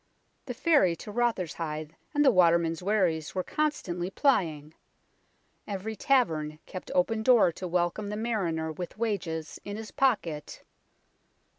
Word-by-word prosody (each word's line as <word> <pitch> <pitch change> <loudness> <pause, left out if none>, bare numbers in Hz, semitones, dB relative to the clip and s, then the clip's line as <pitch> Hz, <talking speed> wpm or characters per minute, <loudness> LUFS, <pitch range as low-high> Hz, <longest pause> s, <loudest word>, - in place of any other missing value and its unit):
The 250 - -4
ferry 260 - +3
to 210 - -9
Rotherhithe 170 -9 -2 0.2
and 295 0 +4
the 265 - +7
watermen's 170 -3 +3
wherries 180 -6 0
were 185 - 0
constantly 185 - -2
plying. 160 - +1 0.9
Every 205 +2 -4
tavern 160 - +1
kept 185 - -8
open 220 +5 +2
door 235 -6 +5
to 180 +3 -6
welcome 175 +4 0
the 210 +1 -4
mariner 180 -9 -1
with 175 +5 -7
wages 175 -8 -3
in 205 +1 -5
his 220 -1 -8
pocket. 175 - -1
185 Hz, 130 wpm, -28 LUFS, 165-220 Hz, 0.9 s, the